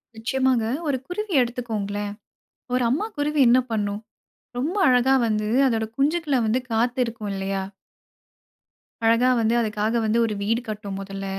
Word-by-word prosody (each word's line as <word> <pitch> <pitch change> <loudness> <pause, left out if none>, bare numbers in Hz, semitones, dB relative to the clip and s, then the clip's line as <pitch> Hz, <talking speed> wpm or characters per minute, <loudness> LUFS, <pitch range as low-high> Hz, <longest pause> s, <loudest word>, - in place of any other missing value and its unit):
நிச்சயமாங்க. 250 +1 +1 0.2
ஒரு 280 -3 +1
குருவி 405 +2 -4
எடுத்துக்கோங்களேன். 210 -4 -3 0.6
ஒரு 250 0 +2
அம்மா 305 - 0
குருவி 295 +1 0
என்ன 250 +2 +6
பண்ணும், 205 -1 -2 0.6
ரொம்ப 310 +10 -2
அழகா 255 +1 +4
வந்து 215 -1 0 0.2
அதோட 225 -2 0
குஞ்சுக்கள 295 +1 +1
வந்து 230 +4 +1
காத்து 240 +3 0
இருக்கும் 220 -3 -6
இல்லையா? 195 0 -2 1.4
அழகா 230 +3 +4
வந்து 225 +1 +2
அதுக்காக 215 0 -1
வந்து 220 +1 +1
ஒரு 220 - -2
வீடு 230 +4 0
கட்டும் 205 -2 -5
முதல்ல. 195 0 -6
230 Hz, 135 wpm, -24 LUFS, 210-260 Hz, 1.4 s, என்ன